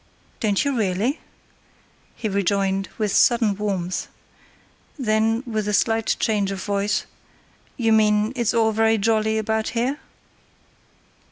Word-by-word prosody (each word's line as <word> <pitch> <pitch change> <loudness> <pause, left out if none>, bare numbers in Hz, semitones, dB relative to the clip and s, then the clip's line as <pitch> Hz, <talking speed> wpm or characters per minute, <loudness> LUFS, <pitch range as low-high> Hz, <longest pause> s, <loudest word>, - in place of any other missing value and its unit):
"Don't 205 0 +1
you 280 -1 0
really?" 215 - 0 1.0
he 225 - -3
rejoined, 195 -1 0
with 215 -2 -1
sudden 230 -4 +4
warmth. 190 -3 -3 0.9
Then, 225 -1 +1
with 215 -3 -2
a 210 - +1
slight 225 +1 +1
change 205 -3 +1
of 195 -1 -5
voice. 200 0 -1 0.7
"You 225 -3 +2
mean 215 +1 +3
it's 235 -2 0
all 225 -1 +3
very 225 +1 +2
jolly 220 +1 +1
about 220 0 -1
here?" 260 +5 0
215 Hz, 120 wpm, -22 LUFS, 200-225 Hz, 1.0 s, sudden